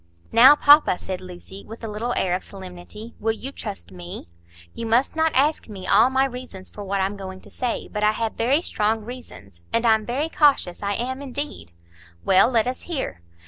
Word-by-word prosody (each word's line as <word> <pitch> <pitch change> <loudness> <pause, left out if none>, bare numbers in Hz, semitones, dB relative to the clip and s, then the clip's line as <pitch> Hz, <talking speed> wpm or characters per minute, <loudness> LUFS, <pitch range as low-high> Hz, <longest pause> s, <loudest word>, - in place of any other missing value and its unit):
"Now, 255 +6 +8
papa," 295 -9 +6
said 185 0 -6
Lucy, 185 +2 -11
with 225 +2 -11
a - - -3
little 220 +3 -3
air 180 - +1
of 180 - -1
solemnity, 190 +4 -9
"will 225 +1 0
you 255 +5 -6
trust 90 - -8
me? 90 -1 -8 0.5
You 230 - -5
must 240 +7 +2
not 320 0 +2
ask 285 -1 +2
me 190 -3 -8
all 215 +7 +5
my 265 +1 +2
reasons 250 -7 -8
for 205 - -8
what 200 0 -2
I'm 195 +2 -1
going 190 -1 -8
to - - -17
say, 245 -2 -3
but 210 0 -4
I 210 0 +4
have 225 0 -2
very 270 +8 +1
strong 215 -4 0
reasons. 100 - -11
And 230 +1 +1
I'm 220 -1 +4
very 280 +7 -1
cautious; 290 - +2
I 200 0 -1
am, 260 +4 -3
indeed." 275 - -5 0.5
"Well, 190 +4 +5
let 230 -4 +2
us 255 +1 -3
hear." 265 - -4
225 Hz, 200 wpm, -23 LUFS, 190-255 Hz, 0.5 s, Now